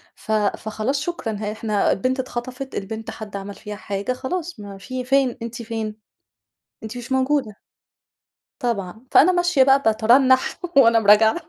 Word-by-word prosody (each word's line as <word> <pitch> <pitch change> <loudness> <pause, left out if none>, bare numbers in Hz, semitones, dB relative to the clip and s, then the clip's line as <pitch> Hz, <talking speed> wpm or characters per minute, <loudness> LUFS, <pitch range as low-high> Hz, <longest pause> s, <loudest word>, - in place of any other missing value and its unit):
ف 220 - -8
فخلاص 215 +5 -1
شكرًا 305 -9 -3
ها 210 0 -4
إحنا 215 -1 0
البنت 255 +7 0
اتخطفت، 255 +1 -5
البنت 220 +3 -5
حد 210 -2 -9
عَمَل 200 0 -6
فيها 210 -1 -8
حاجة 200 +4 -3
خلاص، 335 +1 -5
ما 200 -1 -9
في 255 +5 -5
فين، 270 -2 +2
أنتِ 235 +1 -6
فين؟ 220 -2 -4 0.9
أنتِ 220 +2 -7
مش 245 +2 -6
موجودة. 260 -5 0 1.0
طبعًا. 220 -2 -3
فأنا 365 +5 +6
ماشية 350 -6 +3
بقى 270 +1 +4
باترنّح 250 +4 +3 0.2
وأنا 230 -3 +6
م 215 - -6
راجعة. 220 +4 +6
230 Hz, 150 wpm, -22 LUFS, 215-260 Hz, 1.0 s, فأنا